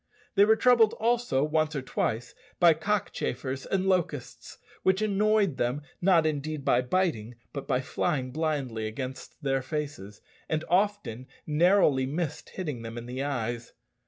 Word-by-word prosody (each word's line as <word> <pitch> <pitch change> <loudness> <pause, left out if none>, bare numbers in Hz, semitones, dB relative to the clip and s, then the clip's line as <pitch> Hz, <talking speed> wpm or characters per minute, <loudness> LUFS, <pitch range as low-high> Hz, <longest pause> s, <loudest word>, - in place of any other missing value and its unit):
They 200 -1 +6
were 220 +1 +5
troubled 230 -2 +5
also, 235 - +1
once 155 +1 +1
or 135 - -2
twice, 120 -2 -2 0.3
by 170 -2 +7
cockchafers 150 -7 -2
and 190 -1 0
locusts, 175 -8 -2 0.2
which 190 0 +3
annoyed 210 -5 +2
them, 125 +5 -1 0.2
not 175 -3 +4
indeed 155 -1 -2
by 120 - +4
biting, 125 - -1 0.2
but 140 - -5
by 125 - +1
flying 130 -1 -1
blindly 135 -7 -2
against 130 +6 -7
their 135 -1 +1
faces, 130 -8 -5 0.3
and 155 0 0
often 185 - 0 0.2
narrowly 155 -4 +3
missed 155 +1 -3
hitting 150 -10 -5
them 115 0 -7
in 120 - -6
the 125 +2 -4
eyes. 120 -4 -3
150 Hz, 145 wpm, -28 LUFS, 130-185 Hz, 0.3 s, by